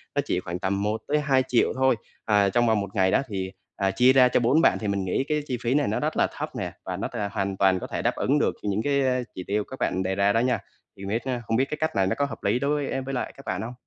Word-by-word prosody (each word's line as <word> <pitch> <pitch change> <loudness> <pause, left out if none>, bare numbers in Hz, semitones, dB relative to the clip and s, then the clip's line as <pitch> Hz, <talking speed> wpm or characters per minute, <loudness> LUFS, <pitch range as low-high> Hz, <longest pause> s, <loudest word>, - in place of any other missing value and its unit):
nó - - +3
chỉ 90 - 0
khoảng 90 -1 -5
tầm 100 +1 -1
1.000.000-2.000.000 130 +3 +1
thôi, 130 -1 +3 0.3
à, 105 -2 +3
trong 120 +4 +2
vòng 110 -2 +3
1 100 - -5
ngày 95 -2 +3
đó, - - +3
thì, 95 -4 -4 0.2
ờ, 95 -1 0
chia 125 +6 +5
ra 130 -1 +7
cho 125 - +2
4 125 +7 +3
bạn - - +4
thì 110 - -3
mình 100 -1 -1
nghĩ 95 +8 0
cái 150 0 +1
chi 125 - -2
phí 120 +1 0
này 145 0 +2
nó - - 0
rất - - -2
là - - +3
thấp - - -3
nè - - -3
và - - -4
nó - - -2
t - - -12 0.2
hoàn 100 -2 -2
toàn 95 -1 +3
có - - -6
thể - - -3
đáp - - 0
ứng - - +1
được - - +1
những 105 +1 0
cái, 140 -1 +2
ờ, 130 -1 +1
chỉ 90 - -5
tiêu 105 +1 0
các 130 - -10
bạn 95 - 0
đề 95 +1 -1
ra 100 +1 +3
đó 115 - +3
nha. 125 +1 +1 0.4
Thì 100 - -8
biết, 110 +4 -2
ơ 125 -2 -2
không 115 - +1
biết 130 - +3
cái 150 - -3
cách 155 +1 -1
này 95 -1 +2
nó - - 0
có 140 - +1
hợp 115 -6 -8
lý 105 +5 +2
đối 145 0 0
e 135 - -2
với 135 +1 -5
lại 125 - -3
các 135 - -13
bạn 95 +1 -2
hông? 115 +3 -5
115 Hz, 305 wpm, -25 LUFS, 100-130 Hz, 0.4 s, ra